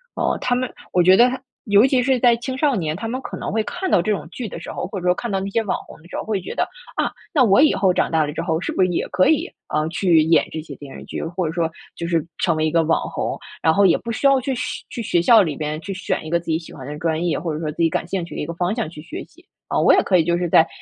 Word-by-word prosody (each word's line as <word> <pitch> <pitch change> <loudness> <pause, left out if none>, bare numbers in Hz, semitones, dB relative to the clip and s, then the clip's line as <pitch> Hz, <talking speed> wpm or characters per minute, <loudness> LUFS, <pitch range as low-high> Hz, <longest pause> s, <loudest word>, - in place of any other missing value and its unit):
哦， - - 0
他 250 - +1
们 255 0 -2 0.2
我 180 - +3
觉 185 +2 +7
得 240 +4 +6
他 260 +1 -4 0.3
尤 205 +3 +5
其 260 -2 +3
是 255 0 +2
在 240 -1 +5
青 260 +2 -5
少 285 -1 +2
年， 160 -6 -1
他 205 +6 -5
们 250 +3 -3
可 - - -7
能 - - -4
会 220 +1 0
看 370 - -4
到 - - +5
这 210 +5 -1
种 195 - -2
剧 240 +1 -5
的 170 - -7
时 - - -7
候， - - -4
或 195 - -5
者 180 - -7
说 180 - +4
看 240 - -4
到 195 -2 0
那 195 - -3
些 230 - +1
网 205 - -1
红 - - -14
的 165 - -16
时 - - -8
候， - - -3
会 215 -3 -1
觉 - - -6
得， - - +2 0.3
啊， - - 0 0.2
那 290 -6 +5
我 200 0 +5
以 310 - +5
后 190 -2 +3
长 - - +1
大 160 -1 +3
了 145 - -4
之 - - -3
后， 160 0 -1
是 - - -2
不 - - -1
是 185 - +3
也 175 - -1
可 185 - +3
以， 315 - +2 0.3
嗯， 155 +1 +1
去 170 -2 +3
演 160 +1 +3
这 160 - -4
些 150 -3 -10
电 140 -2 -10
视 - - -9
剧， - - -5
或 170 +2 -2
者 155 - -4
说 165 -1 0 0.2
就 170 - -4
是 165 -3 +1 0.2
成 170 -3 +2
为 155 0 0
一 - - -1
个 165 0 +3
网 160 +1 +1
红， - - -3 0.3
然 160 - +5
后 200 - +3
也 175 - +5
不 235 - -5
需 230 - -3
要 275 -1 +5
去 265 +2 -2
学 - - -4
去 245 - -4
学 175 -5 +1
校 230 0 +7
里 155 -5 -3
边 150 +1 -3
去 200 - -6
选 190 -4 -3
一 - - -6
个 170 +1 +2
自 170 - -16
己 160 -1 +1
喜 165 - -12
欢 130 -3 -9
的 150 0 -6
专 165 0 -1
业， 170 - 0
或 165 +1 -3
者 150 - -4
说 155 -2 -3
自 150 - -15
己 165 - +4
感 170 - -2
兴 185 -1 -2
趣 - - -10
的 - - -3
一 - - -2
个 170 - -4
方 175 +4 0
向 230 -9 -2
去 155 -2 -10
学 165 - -7
习。 350 +3 -23 0.3
嗯， - - +2
我 - - +6
也 - - +4
可 190 - +1
以 170 - +5
就 170 +1 +1
是 175 0 -1
在 160 0 +5
180 Hz, 360 characters per minute, -21 LUFS, 160-230 Hz, 0.3 s, 觉